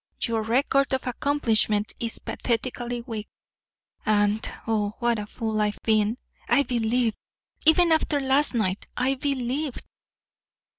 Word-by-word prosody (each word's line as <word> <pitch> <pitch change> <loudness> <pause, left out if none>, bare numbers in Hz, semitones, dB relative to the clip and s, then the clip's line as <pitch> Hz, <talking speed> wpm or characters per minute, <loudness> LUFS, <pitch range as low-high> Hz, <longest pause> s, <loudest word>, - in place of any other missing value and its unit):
Your 230 -2 +1
record 265 +4 +2
of 260 - -4
accomplishment 225 -5 +1
is 230 -1 -2
pathetically 240 0 -2
weak. 225 -3 -6 0.8
And 210 0 +2
oh, 210 -2 0
what 235 -2 +1
a 210 - -5
fool 220 -1 -2
I've 210 0 0
been! 215 +1 +2 0.3
I 280 - +5
believed. 235 -2 0 0.5
Even 335 +1 +6
after 315 -2 +2
last 270 0 +3
night, 195 -4 -1
I 255 +2 +2
believed." 270 +1 -2
235 Hz, 120 wpm, -25 LUFS, 215-265 Hz, 0.8 s, Even